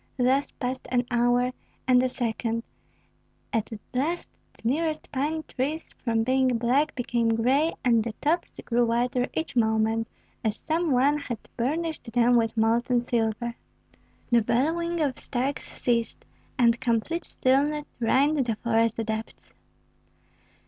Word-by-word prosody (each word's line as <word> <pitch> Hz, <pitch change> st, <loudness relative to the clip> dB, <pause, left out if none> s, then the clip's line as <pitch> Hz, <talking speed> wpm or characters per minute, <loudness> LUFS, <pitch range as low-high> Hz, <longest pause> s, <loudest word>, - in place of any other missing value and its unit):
Thus 260 Hz, +2 st, +2 dB
passed 255 Hz, 0 st, -4 dB
an 245 Hz, -1 st, +1 dB
hour, 245 Hz, +1 st, +3 dB, 0.4 s
and 250 Hz, -1 st, +6 dB
a 255 Hz, -, +1 dB
second; 230 Hz, -1 st, -2 dB, 0.9 s
at 225 Hz, 0 st, -1 dB, 0.2 s
last 310 Hz, +8 st, -1 dB, 0.2 s
the -, -, -6 dB
nearest 310 Hz, +4 st, -1 dB
pine 300 Hz, +3 st, -1 dB
trees 295 Hz, +5 st, -3 dB
from 225 Hz, -2 st, +1 dB
being 255 Hz, 0 st, +2 dB
black 265 Hz, +6 st, +1 dB
became 235 Hz, -2 st, +1 dB
gray, 270 Hz, +8 st, +2 dB
and 230 Hz, -3 st, +4 dB
the 230 Hz, -1 st, -4 dB
tops 325 Hz, +9 st, 0 dB
grew 240 Hz, 0 st, +2 dB
whiter 245 Hz, +2 st, +1 dB
each 320 Hz, -3 st, -3 dB
moment, 220 Hz, -1 st, +2 dB, 0.4 s
as 215 Hz, -2 st, 0 dB
if -, -, -16 dB
some 330 Hz, +1 st, 0 dB
one 275 Hz, +4 st, +3 dB
had 245 Hz, -5 st, -4 dB, 0.2 s
burnished 295 Hz, 0 st, -2 dB
them 245 Hz, 0 st, +4 dB
with 225 Hz, -1 st, +1 dB
molten 235 Hz, +3 st, +2 dB
silver. 235 Hz, 0 st, -1 dB, 0.8 s
The 235 Hz, -1 st, +5 dB
bellowing 325 Hz, +10 st, 0 dB
of 280 Hz, -4 st, 0 dB
stags 270 Hz, +3 st, -2 dB
ceased, 235 Hz, -2 st, -2 dB, 0.3 s
and 235 Hz, -1 st, +3 dB
complete 250 Hz, +9 st, 0 dB
stillness 290 Hz, +4 st, +1 dB
reigned 275 Hz, +6 st, +3 dB
in -, -, +3 dB
the 230 Hz, -2 st, 0 dB
forest 230 Hz, 0 st, +1 dB
depths. 220 Hz, 0 st, -5 dB
245 Hz, 140 wpm, -26 LUFS, 230-285 Hz, 0.9 s, and